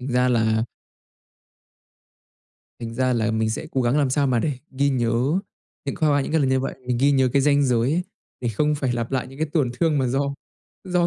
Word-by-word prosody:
Thành 125 Hz, -, -5 dB
ra 125 Hz, 0 st, +3 dB
là 110 Hz, -2 st, +2 dB, 2.2 s
Thành 115 Hz, 0 st, -6 dB
ra 130 Hz, +1 st, +1 dB
là 110 Hz, -2 st, +1 dB
mình 110 Hz, 0 st, 0 dB
sẽ 110 Hz, -, -4 dB
cố 130 Hz, -, 0 dB
gắng 120 Hz, +4 st, +2 dB
làm 140 Hz, -3 st, +2 dB
sao 140 Hz, +1 st, +2 dB
mà 125 Hz, -2 st, +2 dB
để 145 Hz, +5 st, 0 dB, 0.2 s
ghi 140 Hz, +1 st, +1 dB
nhớ 125 Hz, +5 st, +1 dB, 0.5 s
những 140 Hz, -, -3 dB
khoa 155 Hz, -, +2 dB
qua 145 Hz, 0 st, +3 dB
những 135 Hz, -, -4 dB
cái 160 Hz, -, +3 dB
lần 135 Hz, -, +2 dB
như 130 Hz, 0 st, +2 dB
vậy, 135 Hz, -, -3 dB
mình 125 Hz, -1 st, 0 dB
ghi 140 Hz, +2 st, +4 dB
nhớ 130 Hz, -2 st, +3 dB
cái 140 Hz, -1 st, +3 dB
ranh 145 Hz, 0 st, +4 dB
giới 125 Hz, +1 st, +2 dB
ấy 175 Hz, +2 st, +1 dB, 0.4 s
để 120 Hz, -, -1 dB
không 150 Hz, +7 st, +1 dB
phải 135 Hz, -4 st, -1 dB
lặp 115 Hz, -1 st, -3 dB
lại 130 Hz, -2 st, -1 dB
những 135 Hz, -, -13 dB
cái 155 Hz, 0 st, -1 dB
tổn 140 Hz, -7 st, +1 dB
thương 160 Hz, -4 st, +3 dB
mà 130 Hz, -, +1 dB
do 140 Hz, +2 st, -1 dB, 0.5 s
do 180 Hz, -2 st, +1 dB
130 Hz, 235 wpm, -23 LUFS, 120-145 Hz, 2.2 s, ghi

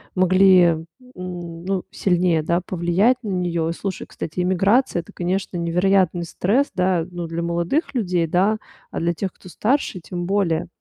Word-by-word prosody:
могли, 185 Hz, 0 st, +6 dB
н 165 Hz, -1 st, 0 dB, 0.3 s
ну, 180 Hz, 0 st, -4 dB
сильнее, 175 Hz, -4 st, +1 dB
да, 170 Hz, +3 st, +1 dB
повлиять 185 Hz, +8 st, +2 dB
на 210 Hz, -, -4 dB
неё. 170 Hz, -3 st, -1 dB
И 165 Hz, -, -1 dB
слушай, 190 Hz, +1 st, -5 dB
кстати, 160 Hz, +3 st, -6 dB
эмиграция 190 Hz, +3 st, +2 dB
это, 165 Hz, -, -16 dB
конечно, 180 Hz, +1 st, -2 dB
невероятный 175 Hz, +1 st, +2 dB
стресс, 220 Hz, -, 0 dB
да, 180 Hz, -3 st, +1 dB
ну, 175 Hz, -1 st, -5 dB
для 165 Hz, +1 st, -3 dB
молодых 170 Hz, -, -1 dB
людей, 180 Hz, -7 st, +1 dB
да, 190 Hz, +6 st, +2 dB, 0.3 s
а -, -, -3 dB
для 170 Hz, +1 st, 0 dB
тех, 190 Hz, +2 st, -4 dB
кто 185 Hz, -, -14 dB
старше, 225 Hz, -2 st, 0 dB
тем 175 Hz, +1 st, -5 dB
более. 190 Hz, -6 st, +1 dB
180 Hz, 160 wpm, -22 LUFS, 170-195 Hz, 0.3 s, могли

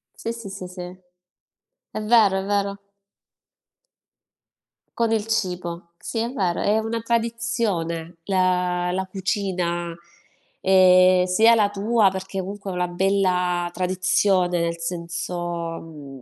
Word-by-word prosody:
Sì, 230 Hz, -, -4 dB
sì, 230 Hz, -4 st, -8 dB
sì, 190 Hz, -1 st, -7 dB
sì. 180 Hz, 0 st, -9 dB, 1.1 s
È -, -, -5 dB
vero, 210 Hz, -3 st, +4 dB
è 190 Hz, -, -3 dB
vero. 200 Hz, 0 st, -1 dB, 2.2 s
Con 230 Hz, -1 st, +1 dB
il 220 Hz, -2 st, +1 dB
cibo. 180 Hz, -5 st, -3 dB
Sì, 230 Hz, -, -5 dB
è 230 Hz, +1 st, -1 dB
vero, 185 Hz, -9 st, -1 dB
è 210 Hz, +2 st, +2 dB
una 225 Hz, +1 st, -2 dB
tradizione 225 Hz, -8 st, -2 dB
la 180 Hz, -2 st, +1 dB
la 190 Hz, +1 st, -2 dB
cucina, 185 Hz, -3 st, -2 dB, 0.7 s
ehm, 185 Hz, -1 st, +6 dB
sia 220 Hz, +6 st, +5 dB
la 210 Hz, -2 st, +3 dB
tua, 205 Hz, 0 st, +2 dB
perché 190 Hz, +1 st, -5 dB
comunque 195 Hz, +1 st, -7 dB
è -, -, -4 dB
una 180 Hz, 0 st, 0 dB
bella 180 Hz, -1 st, +1 dB
tradizione, 185 Hz, 0 st, +1 dB
nel 170 Hz, 0 st, -1 dB
senso, 175 Hz, +1 st, -4 dB, 0.5 s
mhmm, 145 Hz, -5 st, -11 dB
185 Hz, 120 wpm, -23 LUFS, 180-205 Hz, 2.2 s, ehm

